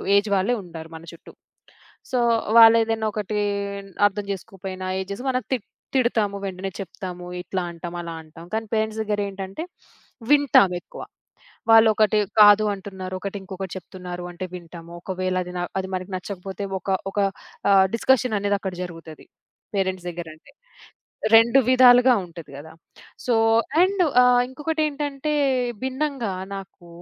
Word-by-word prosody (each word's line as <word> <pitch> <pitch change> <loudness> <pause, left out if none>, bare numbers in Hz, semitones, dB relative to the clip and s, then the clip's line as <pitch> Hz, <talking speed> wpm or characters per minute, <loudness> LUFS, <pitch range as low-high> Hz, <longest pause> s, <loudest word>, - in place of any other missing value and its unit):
Age 205 +1 +2
వాళ్ళే 195 +5 +1
ఉంటారు 165 -2 -10
మన 160 - -10
చుట్టూ. 170 - -14 0.8
సో 255 - +1 0.4
వాళ్ళేదైనా 225 -1 +6
ఒకటి 210 0 -3 0.7
అర్థం 205 0 -5
జేసుకోకపోయినా 190 0 -7
ఏది 190 - -4
జేసినా 245 +7 -5
మనం 255 -2 -1
తి - - +2 0.4
తిడతాము. 220 -6 +1
వెంటనే 190 0 -4
చెప్తాము. 180 -1 -7 0.2
ఇట్లా 185 +1 -3
అంటాము. 170 +1 -7
అలా 170 -1 -6
అంటాం. 165 +2 -13
కానీ 220 0 -1
పేరెంట్స్ 220 0 0
దగ్గర 210 -1 -2
ఏంటంటే 195 +8 -6 0.7
వింటాం 285 -10 +5
ఎక్కువ. - - -11 0.7
వాళ్ళొకటి 220 -1 +5 0.2
కాదు 205 0 +8
అంటున్నారు. 190 -1 -7
ఒకటి 200 +1 -5
ఇంకొకటి 190 -1 -7
చెప్తున్నారు 180 0 -8
అంటే 175 +2 -6
వింటాము. 170 -1 -10
ఒకవేళ 185 0 -3
అది 180 - -8
నా - - -1 0.2
అది 190 - -6
మనకు 185 +1 -7
నచ్చకపోతే 190 +1 -7 0.2
ఒక 195 - -5 0.2
ఒక 205 - -5 0.5
ఆహ్, 190 -1 +6
డిస్కషన్ 250 -2 +2
అనేది 205 0 +1
అక్కడ 190 -2 -4
జరుగుతది. 165 -3 -11 0.5
పేరెంట్స్ 190 -2 -1
దగ్గరంటే. 165 - -10 0.8
2 230 +4 +7
విధాలుగా 255 0 +7
ఉంటది 170 -2 -12
గదా! 155 +3 -10 0.5
సో 245 - +2 0.5
అండ్ 380 +1 +2 0.2
ఆహ్, 250 0 +5
ఇంకొకటెంటంటే 295 0 -2 0.5
భిన్నంగా 265 -4 -2 0.2
నాకు 195 -2 -11
195 Hz, 135 wpm, -23 LUFS, 180-230 Hz, 0.8 s, కాదు